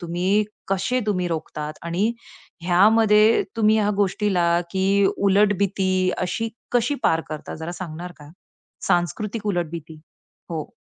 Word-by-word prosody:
तुम्ही 180 +4 +1 0.2
कसे 220 +7 0
तुम्ही 185 -4 0
रोखतात? 155 -2 -4
आणि 180 +7 0 0.5
ह्यामध्ये 210 +4 +5
तुम्ही 215 -1 +4
ह्या 210 -1 +2
गोष्टीला, 185 -4 +1
की 195 +2 +2
उलट 200 +1 +3
भीती 185 -1 +1
अशी 185 +5 -2 0.2
कशी 245 +3 +2
पार 165 - +3
करता 155 -1 -6
जरा 160 +2 -6
सांगणार 175 0 -7
का? 145 0 -14 0.6
सांस्कृतिक 205 +6 -1
उलट 175 -5 -1
भीती. 160 -1 -9 0.5
हो. 160 -3 -4
185 Hz, 125 wpm, -23 LUFS, 170-210 Hz, 0.6 s, ह्यामध्ये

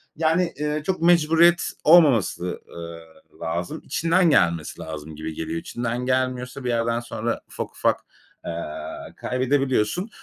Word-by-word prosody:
Yani, 165 +2 +1
eee, 150 0 -1
çok 185 -3 -1
mecburiyet 170 0 +4
olmaması, 135 - +4
ııı, 85 0 -7 0.4
lazım. 85 - -3
İçinden 170 +2 +2
gelmesi 85 - +2
lazım 80 0 -7
gibi 80 +1 -5
geliyor. 80 +1 -3
İçinden 120 +5 -3
gelmiyorsa 130 0 -1
bir 125 - -2
yerden 115 0 +1
sonra 120 -1 -3
ufak - - -6
ufak, - - +1 0.5
eee, - - -3 0.7
kaybedebiliyorsun. 130 - 0
125 Hz, 125 wpm, -24 LUFS, -, 0.7 s, mecburiyet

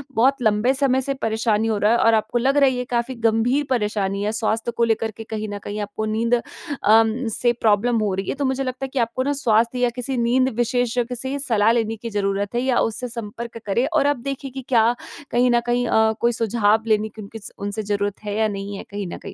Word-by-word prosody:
बहुत 265 +4 +3
लंबे 220 +3 +2
समय 265 -1 +2
से 275 +1 -2
परेशानी 220 -3 0
हो 220 -2 0
रहा 210 +2 +3
है 235 - +4
और 230 0 +4
आपको 220 +2 +1
लग 270 +4 +2
रही 275 -2 +5
है - - -4
ये - - -1
काफ़ी 240 +1 -1
गंभीर 230 +5 +1
परेशानी 210 -5 0
है 210 - 0
स्वास्थ्य 225 +1 -1
को 235 - +3
लेकर 225 -1 +1
के 225 - -6
कहीं 215 -1 -5
न 205 - -4
कहीं 205 +1 -5
आपको 205 +1 -4
नींद 225 +2 0 0.5
अम, 225 +3 +4
से 240 +2 +1
प्रॉब्लम 230 +1 +2
हो 210 -3 0
रही 195 +1 -3
है। - - -1
तो 280 - -2
मुझे 265 +1 0
लगता 255 +1 -4
है - - -7
कि 270 - 0
आपको 235 +2 0
ना 285 - 0
स्वास्थ्य 235 -2 +1
या 245 -1 +3
किसी 255 +1 -3
नींद 250 +2 +2
विशेषज्ञ 245 0 0
से 265 +3 -4
सलाह 225 -5 +3
लेने 225 -1 0
की 230 +1 -7
ज़रूरत 200 +1 -1
है 240 - +1
या 255 -2 +2
उससे 225 +3 -1
संपर्क 230 0 -7
करें 210 +6 +1
और 290 -3 +3
आप 290 -1 +2
देखिए 275 0 -5
कि 265 +1 -6
क्या 235 -1 +4 0.4
कहीं 245 +1 +3
न 240 - +4
कहीं 245 0 +1
अ, 220 0 +3
कोई 235 - +3
सुझाव 220 -1 +1
लेने 215 0 +2
की 215 0 -11
उनकी 215 +2 -9
स 205 - -10
उनसे 205 +2 -4
ज़रूरत 205 0 -2
है 205 0 -3
या 220 0 +2
नहीं 200 0 -5
है - - -7
कहीं 200 -1 -4
न - - -5
कहीं। - - -9
230 Hz, 245 wpm, -22 LUFS, 215-250 Hz, 0.5 s, रही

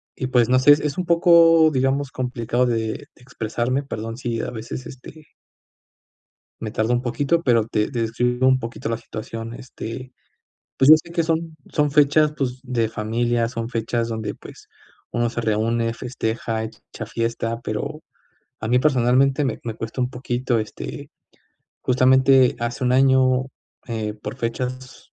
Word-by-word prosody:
y 130 - -3
pues, 125 -2 +3
no 130 0 +4
sé, 140 +3 +7
es 145 0 +5
es 150 -2 -2
un 180 - -1
poco, 165 -2 +6
digamos, 135 0 0
complicado 125 -2 -1
de 120 -2 +1 0.4
de - - -23
expresarme. 125 +1 -2
Perdón 115 -4 -6
si 120 -3 -3
a - - -4
veces, 120 +2 -7
este 145 +4 -12 1.3
me 110 -2 -4
tardó 110 +3 0
un 120 - +1
poquito, 140 +7 0
pero 115 -6 +3
te 105 -1 0
te 120 -4 -2
describo 125 +3 +1
un 130 0 +4
poquito 115 -1 -5
la 115 - -1
situación. 115 0 -7
Este, 125 +1 -8 0.6
pues, 135 - +4
yo 155 - +12
sé 170 - -14
que 170 -1 +1
son, 165 0 -2 0.2
son 150 -1 +1
fechas, 150 +1 +4
pues, 130 -2 -2
de 120 -4 -1
familia, 115 +2 0
son 115 -2 -4
fechas 115 0 -1
donde, 110 -2 -4
pues, - - -14 0.4
uno 120 0 0
se 120 - -4
reúne, 115 +1 0
festeja, 115 -2 -3
hecha 110 0 -9
fiesta, 115 0 -2
pero 140 +8 -4 0.6
a 110 - -3
mí, 125 +2 +4
personalmente, 135 +1 +3
me 130 -5 -2
me 115 -2 -4
cuesta 115 +3 -5
un 125 0 0
poquito, 125 -1 -1
este, 110 -1 -6 0.7
justamente, 130 0 +4
hace 120 +3 -2
1 125 - +2
año, 130 0 +4 0.4
eh, 110 -3 -3
por 105 +4 -7
fechas, 125 +1 -5
125 Hz, 160 wpm, -22 LUFS, 115-135 Hz, 1.3 s, yo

